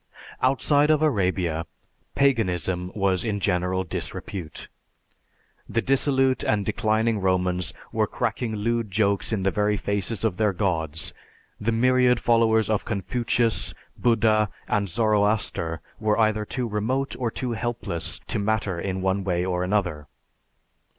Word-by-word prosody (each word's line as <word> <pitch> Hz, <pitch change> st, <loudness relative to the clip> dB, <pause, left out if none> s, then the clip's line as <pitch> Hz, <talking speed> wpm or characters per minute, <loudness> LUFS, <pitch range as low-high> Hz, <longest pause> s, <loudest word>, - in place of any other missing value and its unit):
"Outside 145 Hz, +3 st, +3 dB
of 155 Hz, 0 st, +3 dB
Arabia, 90 Hz, -, 0 dB, 0.5 s
Paganism 95 Hz, -8 st, +1 dB
was 95 Hz, -3 st, +1 dB
in 105 Hz, -3 st, -1 dB
general 90 Hz, 0 st, 0 dB
disrepute. 85 Hz, -1 st, -6 dB, 1.0 s
The 115 Hz, -, 0 dB
dissolute 135 Hz, -1 st, +2 dB
and 105 Hz, -2 st, +1 dB
declining 110 Hz, +1 st, +1 dB
Romans 90 Hz, -2 st, +1 dB, 0.2 s
were -, -, +1 dB
cracking 115 Hz, -3 st, -2 dB
lewd 115 Hz, +1 st, -1 dB
jokes 100 Hz, +1 st, +1 dB
in 105 Hz, -4 st, -1 dB
the 95 Hz, -, +2 dB
very 105 Hz, +1 st, +1 dB
faces 100 Hz, +2 st, -1 dB
of 100 Hz, -5 st, 0 dB
their 105 Hz, -2 st, +2 dB
gods, 80 Hz, -5 st, -1 dB, 0.5 s
the 110 Hz, +2 st, 0 dB
myriad 125 Hz, +1 st, +3 dB
followers 110 Hz, -2 st, +3 dB
of 110 Hz, -2 st, 0 dB
Confucius, 115 Hz, 0 st, 0 dB, 0.2 s
Buddha 110 Hz, -3 st, +3 dB, 0.2 s
and 100 Hz, -1 st, 0 dB
Zoroaster 105 Hz, -6 st, +1 dB, 0.2 s
were 110 Hz, -1 st, +1 dB
either 110 Hz, -1 st, +2 dB
too 125 Hz, +2 st, -3 dB
remote 115 Hz, +6 st, -1 dB
or 120 Hz, -2 st, 0 dB
too 125 Hz, +2 st, -4 dB
helpless 110 Hz, -8 st, -3 dB
to 110 Hz, -, -2 dB
matter 100 Hz, -4 st, 0 dB
in 95 Hz, +1 st, -3 dB
one 95 Hz, +1 st, +1 dB
way 90 Hz, -1 st, 0 dB
or 90 Hz, -1 st, -1 dB
another. 90 Hz, -6 st, -1 dB
105 Hz, 130 wpm, -25 LUFS, 95-115 Hz, 1.0 s, Outside